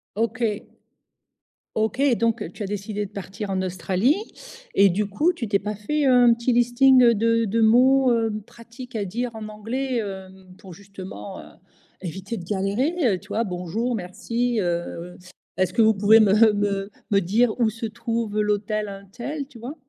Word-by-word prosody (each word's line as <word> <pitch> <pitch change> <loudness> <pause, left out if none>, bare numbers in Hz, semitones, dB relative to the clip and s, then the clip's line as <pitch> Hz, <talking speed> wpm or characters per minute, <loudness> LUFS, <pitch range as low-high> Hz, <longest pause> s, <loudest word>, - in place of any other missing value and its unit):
OK. 230 +3 -1 1.3
OK, 220 +4 0 0.2
donc, 230 0 0
tu 215 - -6
as - - -2
décidé 205 +1 -4
de 195 - -12
partir 200 0 -6
en 190 -1 0
Australie 185 - +1 0.6
et 200 0 +6
du 205 +4 0
coup, 300 - +1
tu 260 -10 -5
t'es 200 -1 +2
pas 210 +1 -4
fait 290 +8 -1
un 245 -2 +6
petit 235 +2 -1
listing 245 0 +5
de 230 +1 +2
de 225 +3 0
mots, 255 +4 +5
heu, 225 -2 +1
pratiques, 235 +1 -12
à 205 - -1
dire 235 +6 -3
en 220 -1 -6
anglais, 235 +4 -3
heu, 190 -2 -6 0.3
pour 190 -4 -12
justement, 190 - -9
heu, - - -11 0.6
éviter 195 +5 -5
de 175 - -7
galérer, 205 - -1 0.2
heu, 185 - -2
tu - - -19
vois? 230 - 0
Bonjour, 190 +6 -3
merci, 230 +6 -2
heu, 175 0 -3 0.4
est-ce 185 -1 +1
que 230 - +3
vous 220 0 +5
pouvez 210 +3 +5
me, 210 -3 +4 0.3
heu, 195 0 -2 0.2
me 200 - +5
dire 220 +7 +1
où 230 - +3
se 225 +1 -6
trouve 225 -1 -2
l'hôtel 210 0 -1
untel, 235 +9 -6
tu 255 -5 -15
vois? 255 +6 -7
215 Hz, 170 wpm, -23 LUFS, 195-240 Hz, 1.3 s, et